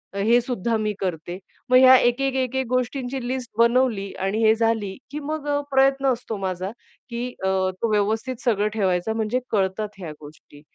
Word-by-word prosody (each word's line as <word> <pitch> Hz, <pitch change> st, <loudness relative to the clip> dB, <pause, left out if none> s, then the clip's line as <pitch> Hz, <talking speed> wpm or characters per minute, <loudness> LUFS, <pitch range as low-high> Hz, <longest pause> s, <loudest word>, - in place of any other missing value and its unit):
हे 225 Hz, +5 st, +4 dB
सुद्धा 235 Hz, -2 st, -2 dB
मी 215 Hz, -1 st, -1 dB
करते. 175 Hz, -1 st, -4 dB, 0.3 s
मग 255 Hz, -, +6 dB
ह्या 260 Hz, 0 st, +8 dB
एक-एक-एक-एक 265 Hz, +1 st, 0 dB
गोष्टींची 255 Hz, 0 st, -2 dB
लिस्ट 255 Hz, -2 st, -4 dB
बनवली. 235 Hz, -4 st, +2 dB
आणि 195 Hz, +4 st, 0 dB
हे 220 Hz, 0 st, +6 dB
झाली, 225 Hz, -4 st, 0 dB
की 295 Hz, -, -4 dB
मग 300 Hz, 0 st, -4 dB, 0.2 s
प्रयत्न 270 Hz, 0 st, +3 dB
असतो 230 Hz, -2 st, -6 dB
माझा, 185 Hz, 0 st, -3 dB, 0.4 s
की 240 Hz, +1 st, -3 dB, 0.2 s
अ, -, -, +1 dB, 0.3 s
तो 230 Hz, -, 0 dB
व्यवस्थित 220 Hz, +5 st, 0 dB
सगळं 210 Hz, -3 st, +2 dB
ठेवायचा. 190 Hz, -1 st, 0 dB
म्हणजे 220 Hz, +2 st, -1 dB
कळतात 200 Hz, +1 st, 0 dB
ह्या 170 Hz, -4 st, -6 dB
गोष्टी. 145 Hz, -1 st, -15 dB
225 Hz, 155 wpm, -23 LUFS, 200-255 Hz, 0.4 s, ह्या